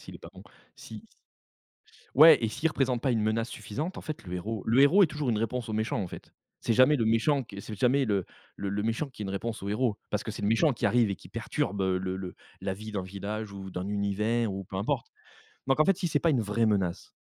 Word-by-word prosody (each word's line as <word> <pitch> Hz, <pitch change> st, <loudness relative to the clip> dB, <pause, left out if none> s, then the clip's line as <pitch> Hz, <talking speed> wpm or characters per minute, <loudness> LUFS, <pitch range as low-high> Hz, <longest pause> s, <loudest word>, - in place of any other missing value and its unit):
s'il -, -, -11 dB
est -, -, -21 dB
pas -, -, -12 dB
bon, -, -, -13 dB, 0.3 s
si -, -, -10 dB
s -, -, -26 dB, 1.0 s
ouais 155 Hz, +2 st, +9 dB
et 115 Hz, -, +2 dB
s'il 155 Hz, +9 st, 0 dB
représente 130 Hz, -5 st, 0 dB
pas 130 Hz, -, +2 dB
une 115 Hz, -3 st, +1 dB
menace 110 Hz, +2 st, 0 dB
suffisante, 150 Hz, -, -5 dB
en -, -, -5 dB
fait, 155 Hz, -2 st, -6 dB
le 90 Hz, -, -6 dB
héros 105 Hz, +3 st, -4 dB
le 115 Hz, +4 st, +4 dB
héros 155 Hz, +9 st, +6 dB
est -, -, +7 dB
toujours 150 Hz, -4 st, -2 dB
une 110 Hz, -, 0 dB
réponse 115 Hz, +2 st, -2 dB
au -, -, -3 dB
méchant, 110 Hz, +1 st, -1 dB
en -, -, -3 dB
fait. -, -, -11 dB, 0.3 s
C'est -, -, 0 dB
jamais 130 Hz, +6 st, +5 dB
le 115 Hz, -, 0 dB
méchant 120 Hz, +6 st, +2 dB
qui 105 Hz, -4 st, -12 dB
est 100 Hz, -, -5 dB
c'est 105 Hz, -, -7 dB
jamais 135 Hz, +4 st, +3 dB
le 100 Hz, -4 st, 0 dB, 0.3 s
le 100 Hz, -, -3 dB
le 100 Hz, +1 st, -1 dB
méchant 115 Hz, +7 st, -1 dB
qui 130 Hz, -5 st, -9 dB
est -, -, -3 dB
une 95 Hz, -, -4 dB
réponse 105 Hz, +3 st, -4 dB
au 100 Hz, -, -4 dB
héros, 110 Hz, +1 st, 0 dB
parce -, -, -1 dB
que -, -, -4 dB
c'est -, -, -7 dB
le 100 Hz, -, +1 dB
méchant 125 Hz, +7 st, +3 dB
qui 120 Hz, -, -1 dB
arrive 115 Hz, -4 st, +3 dB
et 100 Hz, -, -2 dB
qui -, -, -15 dB
perturbe, 100 Hz, +1 st, -2 dB
heu, 95 Hz, -1 st, +1 dB
le 95 Hz, 0 st, -3 dB
le 95 Hz, -1 st, -6 dB, 0.3 s
la 95 Hz, 0 st, -2 dB
vie 110 Hz, +2 st, -8 dB
d'un 100 Hz, -, -2 dB
village 100 Hz, +3 st, -5 dB
ou 95 Hz, -1 st, -8 dB
d'un 90 Hz, +1 st, -4 dB
univers 105 Hz, +2 st, 0 dB
ou 95 Hz, 0 st, -5 dB
peu 95 Hz, -, -7 dB
importe, 100 Hz, +3 st, -1 dB, 0.6 s
donc 135 Hz, +1 st, +2 dB
en -, -, +7 dB
fait, 195 Hz, +1 st, +3 dB
si 175 Hz, -2 st, -1 dB
c'est 145 Hz, -, +1 dB
pas 165 Hz, -, +3 dB
une 130 Hz, -, +2 dB
vraie 110 Hz, +2 st, +1 dB
menace 95 Hz, -5 st, 0 dB
110 Hz, 270 wpm, -28 LUFS, 100-130 Hz, 1.0 s, ouais